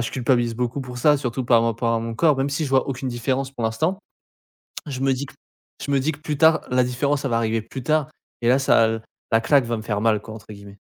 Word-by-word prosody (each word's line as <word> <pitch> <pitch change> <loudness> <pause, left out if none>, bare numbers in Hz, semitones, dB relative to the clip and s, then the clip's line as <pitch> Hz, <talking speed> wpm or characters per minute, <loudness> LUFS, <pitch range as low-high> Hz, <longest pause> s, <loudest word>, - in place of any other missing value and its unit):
ben, - - +1
je - - -3
culpabilise 120 -2 +1
beaucoup 125 +3 -2
pour 125 -1 -7
ça, 150 +3 +4
surtout, 130 -1 -3
par 120 -2 +4
rapport 115 0 0
à 115 - +1
mon 115 0 -5
corps. 150 +2 +3
Même 135 +1 0
si 145 +3 -2
je 140 - -4
vois 135 -1 +3
aucune 130 0 -3
différence 130 +2 -2
pour 125 -4 -5
l'instant, 155 - 0 0.9
je 135 -3 -5
me 135 0 +2
dis 130 +2 -4
que - - -14 0.5
je - - -5
me 140 - +3
dis 155 +4 0
que 145 - -11
plus 150 -2 -4
tard 160 0 +5
la 125 0 +3
différence, 140 +3 -1
elle 130 - -1
va 115 - +2
arriver 115 -1 0
plus 130 +4 -8
tard. 155 +2 +1 0.3
Et - - +2
là, 125 - +5
ça 120 -4 +4
l 110 0 -2 0.3
la 115 - +4
claque 135 +1 +3
va 115 -1 -2
me - - -6
faire 105 -2 -2
mal, 110 -1 +2
quoi, 110 - -10
entre 110 0 -12
guillemets. 100 -1 -11
125 Hz, 275 wpm, -22 LUFS, 115-140 Hz, 0.9 s, tard